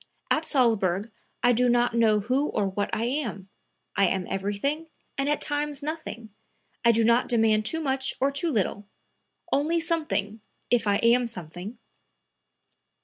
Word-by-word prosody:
At 315 - +2
Salzburg 220 - +1 0.3
I 245 - +5
do 245 +1 +3
not 240 0 +2
know 220 -3 +3
who 260 +7 0
or 205 - -1
what 200 +2 -2
I 220 - -1
am; 235 -7 -3 0.5
I 195 - +4
am 185 0 -1
everything 205 +12 -2 0.3
and 275 +1 -1
at 295 - +1
times 290 0 -1
nothing. 285 -8 -6 0.5
I 235 - +6
do 230 0 +2
not 235 +2 +3
demand 220 -3 +3
too 320 +5 0
much 265 -2 0
or 275 +2 +2
too 280 +5 -1
little; 205 -3 -1 0.7
only 315 +4 +2
something, 305 - -1 0.3
if 240 -3 +2
I 200 - +3
am 240 +1 +4
something." 180 +2 -7
235 Hz, 150 wpm, -26 LUFS, 210-280 Hz, 0.7 s, I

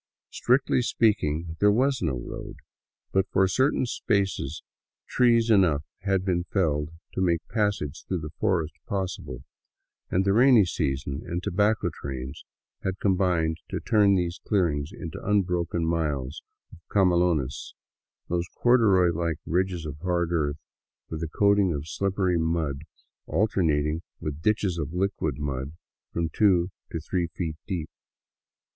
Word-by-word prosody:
Strictly 130 +1 +2
speaking, 85 -9 +1
there 105 0 +5
was 130 +5 +2
no 75 -8 0
road; - - -7 0.6
but 95 0 +1
for 95 0 +3
certain 130 +7 +2
spaces 100 - -1 0.4
trees 115 -2 +3
enough 85 -9 +4 0.2
had 95 0 0
been 90 -2 +1
felled 75 -7 0 0.2
to - - -2
make 85 -3 +1
passage 105 - -1
through 90 -3 -2
the 75 0 -6
forest 85 -7 +1
possible, 90 -9 -4 0.7
and 95 +2 +1
the 100 - +3
rainy 120 -2 +6
season 70 -3 -2
and 85 +1 -4
tobacco 105 +2 +1
trains 65 -1 -6 0.4
had 95 0 -2
combined 90 -5 +1
to - - -2
turn 105 -2 +4
these 90 -1 -1
clearings 80 -6 0
into 90 -9 -7
unbroken 90 -4 0
miles 75 -4 -1 0.3
of - - -13
camelones, 85 -8 +1 0.5
those 85 0 -1
corduroy 100 -8 +4
like 85 -1 -1
ridges 90 0 -1
of 75 -1 -6
hard 85 -1 0
earth 75 -4 0 0.5
with 80 0 -4
a 80 - -2
coating 100 +1 +3
of 70 +2 -5
slippery 95 -1 0
mud, 80 -3 -1 0.4
alternating 80 -5 +1 0.2
with 75 0 -5
ditches 100 -3 +1
of 75 +1 -4
liquid 95 +2 -1
mud 70 -1 -3 0.4
from 85 -1 -1
two 90 +1 +3 0.2
to 80 - -3
three 85 +2 -1
feet 80 -1 -4
deep. 85 -7 -3
90 Hz, 135 wpm, -26 LUFS, 80-100 Hz, 0.7 s, rainy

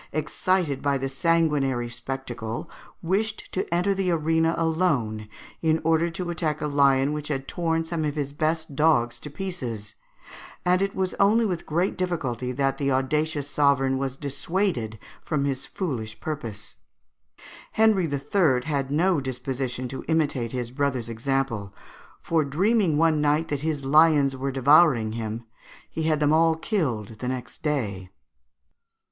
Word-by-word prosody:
excited 155 0 0
by 140 -1 +1
the 135 0 -2
sanguinary 140 -4 +1
spectacle, 120 -2 -5 0.4
wished 200 +5 -1
to 185 - -3
enter 180 +3 +2
the 190 -1 -1
arena 165 0 +2
alone 150 -11 0 0.3
in 160 0 +2
order 165 +1 +2
to 175 +1 -4
attack 160 -3 -1
a - - -2
lion 140 -1 +3
which 150 0 -4
had 135 -2 -3
torn 165 -1 -1
some 165 -1 -2
of 150 -1 -1
his 140 -2 -3
best 155 0 -1
dogs 120 -6 +2
to 150 - -8
pieces, 130 - -5 0.7
and 180 +1 +3
it 195 0 -1
was 185 -1 -1
only 215 +4 +4
with 180 -5 -3
great 175 +5 0
difficulty 130 -9 -2
that 135 +1 0
the 140 -1 +1
audacious 145 +3 0
sovereign 135 -2 +2
was 135 -1 -3
dissuaded 140 - -2 0.3
from 145 -3 -1
his 135 -1 -2
foolish 115 - -4
purpose. 115 -9 -6 1.0
Henry 210 -7 +3
III. 140 -2 +2
had 140 -3 -1
no 165 +2 +2
disposition 130 -1 -3
to 130 - -6
imitate 145 -8 0
his 125 -2 -4
brother's 130 -3 -1
example; 115 -4 -2 0.4
for 165 -2 +1
dreaming 180 +3 +2
one 160 -1 +3
night 150 +2 +2
that 145 - -1
his 150 -3 -2
lions 145 -1 +5
were 135 +1 -2
devouring 135 -3 +5
him, 110 0 -4 0.5
he 160 - -4
had 155 -1 +1
them 150 0 +3
all 165 0 +4
killed 125 - -2
the 125 - -4
next 130 -1 -5
day. 105 - -2
145 Hz, 150 wpm, -25 LUFS, 130-165 Hz, 1.0 s, lions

